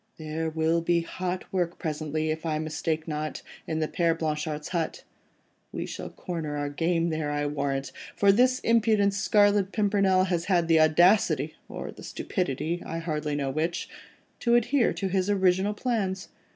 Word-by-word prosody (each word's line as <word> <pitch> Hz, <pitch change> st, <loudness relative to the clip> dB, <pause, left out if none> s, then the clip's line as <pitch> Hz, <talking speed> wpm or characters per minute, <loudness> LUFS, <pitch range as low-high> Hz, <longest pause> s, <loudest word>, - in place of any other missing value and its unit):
There 160 Hz, +1 st, -3 dB
will 160 Hz, +1 st, +1 dB
be 170 Hz, 0 st, +2 dB
hot 180 Hz, +2 st, -4 dB
work 175 Hz, -2 st, 0 dB
presently, 155 Hz, 0 st, -2 dB
if 160 Hz, +1 st, -4 dB
I 160 Hz, -2 st, -1 dB
mistake 155 Hz, +1 st, -2 dB
not, 155 Hz, 0 st, -4 dB, 0.2 s
in 160 Hz, 0 st, -1 dB
the 155 Hz, -, +1 dB
Père 165 Hz, 0 st, +1 dB
Blanchard's 150 Hz, -1 st, -3 dB
hut. 170 Hz, -3 st, -2 dB, 0.7 s
We -, -, -4 dB
shall -, -, -6 dB
corner 160 Hz, -4 st, -5 dB
our 145 Hz, 0 st, -2 dB
game 165 Hz, +3 st, 0 dB
there, 155 Hz, -2 st, -2 dB
I'll 145 Hz, 0 st, -1 dB
warrant, 140 Hz, -2 st, -2 dB, 0.2 s
for 200 Hz, -1 st, +5 dB
this 250 Hz, +5 st, +4 dB
impudent 220 Hz, -3 st, +3 dB
Scarlet 205 Hz, 0 st, +3 dB
Pimpernel 200 Hz, -3 st, +3 dB
has 175 Hz, -3 st, -1 dB
had 175 Hz, -4 st, +2 dB
the 165 Hz, -1 st, +5 dB
audacity—or 175 Hz, +7 st, +2 dB
the -, -, -13 dB
stupidity, 170 Hz, -, -2 dB
I 165 Hz, -, -5 dB
hardly 155 Hz, -3 st, -2 dB
know 140 Hz, -2 st, -1 dB
which—to 170 Hz, -, -3 dB
adhere 240 Hz, +2 st, +3 dB
to 195 Hz, -, -2 dB
his 190 Hz, +1 st, 0 dB
original 190 Hz, +1 st, +2 dB
plans. 200 Hz, -6 st, -2 dB
170 Hz, 155 wpm, -27 LUFS, 155-195 Hz, 0.7 s, for